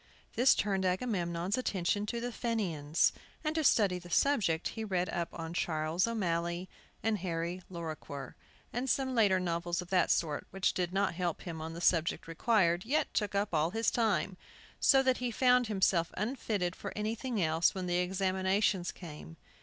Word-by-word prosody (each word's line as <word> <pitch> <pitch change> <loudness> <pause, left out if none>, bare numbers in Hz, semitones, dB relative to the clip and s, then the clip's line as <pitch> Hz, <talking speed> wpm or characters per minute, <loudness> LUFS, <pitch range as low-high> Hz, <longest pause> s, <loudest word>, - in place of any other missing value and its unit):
This 250 +3 +5
turned 195 -2 0
Agamemnon's 185 -1 -1
attention 205 -2 -1
to 235 +2 -2
the 245 +1 -3
Fenians, 175 -11 0 0.3
and 310 0 0
to 320 -1 0
study 200 -9 +3
the 175 0 -12
subject 185 - +2
he 225 - -5
read 185 -4 0
up 170 0 -2
on 165 0 -6
"Charles 160 +2 0
O'Malley," 175 -5 -1 0.4
and 220 -2 +1
"Harry 170 0 -3
Lorrequer," 160 -5 -6 0.4
and 250 +3 -2
some 265 0 +1
later 205 -6 +4
novels 175 -1 -1
of 180 0 -6
that 180 -2 +3
sort, 150 -3 0
which 195 0 0
did 180 -1 -1
not 195 0 +1
help 175 -1 -2
him 165 -3 -6
on 160 +1 -5
the 170 - -7
subject 170 -2 +1
required, 175 0 +2
yet 285 +7 0
took 210 -2 -1
up 200 -1 0
all 155 +1 +2
his 225 +4 0
time, 205 -5 0 0.4
so 270 -1 +5
that 260 -1 +2
he 250 -1 -2
found 250 0 +3
himself 190 -5 +2
unfitted 210 -5 -1
for - - -6
anything 225 +2 -2
else 165 +1 +2
when 185 -1 -3
the 175 0 0
examinations 190 +1 +1
came. 165 -1 -10
185 Hz, 170 wpm, -32 LUFS, 170-220 Hz, 0.4 s, This